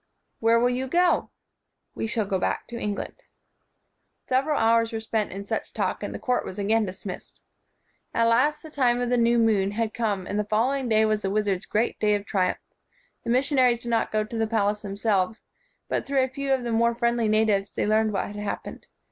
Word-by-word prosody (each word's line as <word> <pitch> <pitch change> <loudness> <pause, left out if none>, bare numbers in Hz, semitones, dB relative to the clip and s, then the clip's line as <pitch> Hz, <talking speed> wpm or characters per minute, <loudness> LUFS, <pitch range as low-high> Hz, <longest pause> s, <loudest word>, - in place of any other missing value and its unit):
' - - -50
' - - -50
Where 230 +1 +4
will 245 +1 +3
you 255 +2 -2
go? 350 +5 +2 0.3
" - - -54
"We - - -2
shall 220 -1 0
go 195 -1 -1
back - - -1
to 240 - -7
England." 205 -1 -3 1.1
Several 275 +4 +1
hours 230 0 +3
were 225 - -3
spent 220 -1 -2
in 200 +2 -6
such - - -4
talk, - - -2
and - - -4
the - - -5
court 250 -1 0
w - - -9
r - - -3
as 185 - -9
again 210 +1 +1
dismissed. 185 0 -8 0.7
At 230 - +2
last 290 +7 +2
the 315 - -10
time 245 -4 +2
of 245 0 -1
the 245 - +3
new 235 0 +3
moon 215 -4 +3
had 225 0 -1
come 205 -5 -1
and 205 - -2
the - - +1
following 245 +5 0
day 220 0 +4
was 215 -1 +1
the 195 - -1
wiz 210 +1 0
ard's 190 -1 -1
great 220 +3 0
day 210 -1 +3
of 205 0 -4
triumph. 185 -3 0 0.7
The - - -5
mission 265 +3 +2
aries 250 -2 +4
did 240 - -6
not 230 - +1
go 215 0 +1
to 220 +2 -6
the 225 - +1
palace 210 -2 0
themselves; 200 0 -1 0.4
but, - - -2
through 270 -1 +2
a - - +1
few 275 +1 -3
of 265 -2 +2
the 235 - -3
more 235 +1 +2
friendly 235 -1 +1
na 215 +1 +3
tives, 200 -2 0
they - - 0
learned 215 +1 +2
what 195 - -1
had 205 - -8
happened. 205 0 -5
225 Hz, 235 wpm, -25 LUFS, 210-240 Hz, 1.1 s, Where